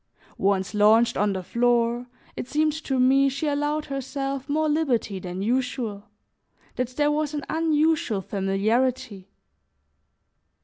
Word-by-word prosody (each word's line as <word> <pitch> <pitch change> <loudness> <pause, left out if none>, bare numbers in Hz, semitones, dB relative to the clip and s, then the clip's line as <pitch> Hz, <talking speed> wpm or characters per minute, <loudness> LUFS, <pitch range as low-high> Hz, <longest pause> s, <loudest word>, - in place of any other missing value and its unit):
Once 195 0 +1
launched 215 +3 +4
on 205 +1 +1
the 190 -1 -4
floor, 240 +3 +1 0.3
it - - -5
seemed 305 +2 +1
to 285 -4 -2
me 270 +2 +4
she 275 +3 -4
allowed 295 +1 -1
herself 275 0 -4
more 310 +2 +1
liberty 265 -10 0
than 180 +1 -5
usual, 235 -3 -2 0.7
that 250 - -1
there 295 0 +2
was 300 0 -1
an 290 - -4
unusual 315 -8 +1
familiarity. 200 +2 -1
255 Hz, 125 wpm, -25 LUFS, 210-295 Hz, 0.7 s, launched